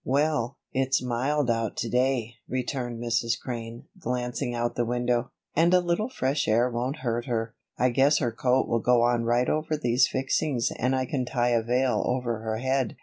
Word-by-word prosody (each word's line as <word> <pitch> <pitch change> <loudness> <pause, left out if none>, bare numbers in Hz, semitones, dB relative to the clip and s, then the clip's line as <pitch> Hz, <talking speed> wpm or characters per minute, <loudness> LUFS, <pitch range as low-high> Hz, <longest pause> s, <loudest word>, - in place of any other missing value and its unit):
"Well, 140 -2 0 0.2
it's 135 0 +2
mild 125 +2 0
out 115 -2 -2
to 120 - -1
day," 125 -1 +1 0.2
returned 125 -2 -3
Mrs. 115 -1 0
Crane, 115 0 -6 0.2
glancing 125 -2 -2
out 120 0 -1
the 120 - 0
window, 120 +1 0 0.3
"and 170 +3 +4
a - - +6
little 175 +6 0
fresh 140 - -1
air 120 +3 +3
won't 125 +5 -3
hurt 120 0 -1
her. 115 -1 -2 0.2
I 125 - +3
guess 140 +4 +4
her 120 - 0
coat 125 +3 +1
will 115 - +1
go 120 +1 +3
on 120 -1 +2
right 120 +2 +2
over 155 0 0
these 125 -2 +3
fixings 135 -1 0
and 125 +2 0
I 130 0 0
can 130 0 -2
tie 120 -1 0
a 120 -1 +3
veil 125 +3 +1
over 120 -3 -1
her 110 0 -3
head. 130 0 0
125 Hz, 190 wpm, -26 LUFS, 120-135 Hz, 0.3 s, a